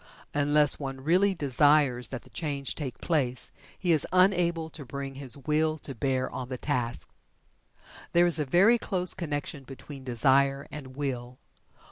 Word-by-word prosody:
Unless 145 0 +3
one 135 -2 -5
really 185 +7 +3
desires 140 -4 +3
that 130 - -6
the - - -19
change 140 -4 -3
take 135 -5 -6
place, 130 -7 -1 0.3
he 180 - 0
is 155 -3 +3
unable 175 -3 +3
to 150 - -8
bring 135 +1 -6
his 135 -1 -6
Will 155 +2 0
to 140 - -6
bear 130 +1 -1
on 125 -1 -6
the 130 - -4
task. 125 -4 -2 1.0
There 175 +1 +5
is 170 -2 +3
a - - +2
very 195 - +5
close 185 -4 0
connection 145 -4 -4
between 135 +1 -10
Desire 135 +3 +2
and 130 -4 -9
Will. 125 -3 -4
145 Hz, 155 wpm, -28 LUFS, 130-160 Hz, 1.0 s, There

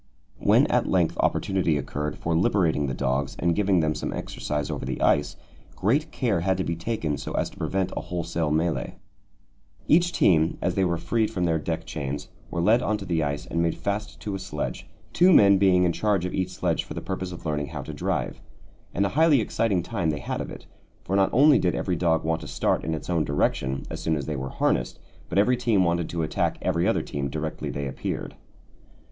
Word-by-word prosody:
When - - +5
at - - +1
length 90 -3 +2
opportunity 90 -5 +1
occurred 75 +1 -4
for 85 0 -1
liberating 80 -4 +2
the 65 - -3
dogs 65 +1 -1
and 85 0 +1
giving 100 -4 +3
them 75 -1 +1
some - - -4
exercise 75 -1 -3
over - - -4
the - - -3
ice, 75 +1 +2 0.4
great 130 +11 +1
care 115 - 0
had 95 +2 +1
to 95 - 0
be 85 - -2
taken 85 - -2
so - - -6
as - - -1
to - - -17
prevent 95 -1 -1
a - - -2
wholesale 85 -2 -2
mêlée. 80 +2 0 0.9
Each 175 +2 +4
team, 80 - +3
as 90 - 0
they 95 0 +1
were 85 -2 +1
freed 110 +5 0
from 90 - -2
their 80 -2 +2
deck 75 - -3
chains, 70 +1 -5 0.2
were 85 - -2
led 115 +6 +4
on 110 -3 0
to 100 - -8
the 85 -3 0
ice 75 -1 -2
and 85 - -1
made 85 -1 +1
fast 105 +1 -3
to 105 - -4
a 95 - -3
sledge, 95 -6 -5 0.3
two 180 +2 +5
men 100 - +7
being 95 -2 +4
in 90 - +3
charge 100 -3 +1
of 90 - -4
each 95 -1 -1
sledge 90 - -1
for - - -9
the - - -2
purpose 95 -1 -4
of 90 - -9
learning 75 -2 -1
how 70 -1 -6
to - - -7
drive. - - -2 0.5
And 100 - +2
a - - +1
highly 155 +1 +4
exciting 105 -4 0
time 85 -4 -1
they 75 - -1
had - - -3
of - - -5
it, - - -10 0.4
for 95 - -2
not 95 -1 +4
only 140 +1 +6
did 90 - +1
every 90 - -1
dog 80 -2 +1
want 80 0 -1
to - - -8
start - - 0
in 80 0 -1
its 80 - -7
own 85 -3 +1
direction 65 -2 0
as - - -5
soon 80 - +1
as 70 -3 -3
they 75 - -3
were 65 -1 -4
harnessed, - - 0 0.3
but 90 - -2
every 120 +5 +4
team 115 -6 +2
wanted 85 -1 0
to 85 -1 -2
attack 80 - -1
every - - +1
other - - +1
team 70 -1 -3
directly 80 +2 -4
they 70 0 -3
appeared. 65 - -4
85 Hz, 225 wpm, -25 LUFS, 75-100 Hz, 0.9 s, men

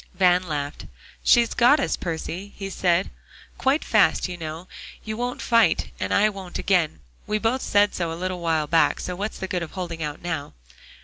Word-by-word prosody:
Van 180 -1 +4
laughed. 145 -2 -4 0.4
"She's 235 -2 +4
got 250 +6 +5
us, 275 - 0
Percy," 175 +4 -5
he 195 -1 -5
said, 180 0 +1 0.5
"quite 270 +4 +2
fast. - - +3
You 180 - -5
know 165 +1 -7 0.4
you 215 0 -4
won't 245 +2 -3
fight, 230 -8 +3
and - - -2
I 210 - +4
won't 195 -4 -6
again; 170 - +1 0.3
we 210 - +1
both 230 +4 0
said 205 0 +3
so 170 -2 -2
a - - -4
little 185 0 -3
while 165 -3 +1
back; 165 +2 +3
so 180 - -4
what's 205 +4 -4
the 190 - -4
good 180 -1 -2
of 170 - -6
holding 175 -3 -5
out 150 -1 -4
now?" 165 -5 -4
180 Hz, 190 wpm, -24 LUFS, 165-210 Hz, 0.5 s, got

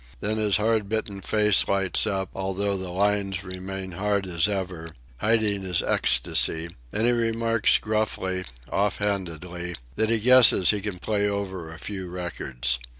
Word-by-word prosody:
Then 110 - -2
his 105 -2 +2
hard 110 -1 0
bitten 105 -3 -3
face 105 -1 +3
lights 100 +2 +2
up, 95 -3 -2
although 95 +1 -2
the 95 -1 -5
lines 100 0 -1
remain 95 0 -6
hard 100 +2 -1
as 85 0 +1
ever, 90 -5 -4 0.3
hiding 105 - +1
his 90 -3 -1
ecstasy, 80 +6 +2 0.2
and 110 +2 -1
he 120 - +4
remarks 115 -1 +2
gruffly, 105 -4 -2 0.3
off 100 +1 0
handedly, 90 -3 -3 0.2
that 110 - +1
he 115 - +3
guesses 120 -6 +7
he 105 -1 -2
can 100 -2 -4
play 105 +2 -1
over 95 -5 -5
a 80 - -10
few 95 +1 -6
records. 65 -8 -3
100 Hz, 150 wpm, -25 LUFS, 90-105 Hz, 0.3 s, guesses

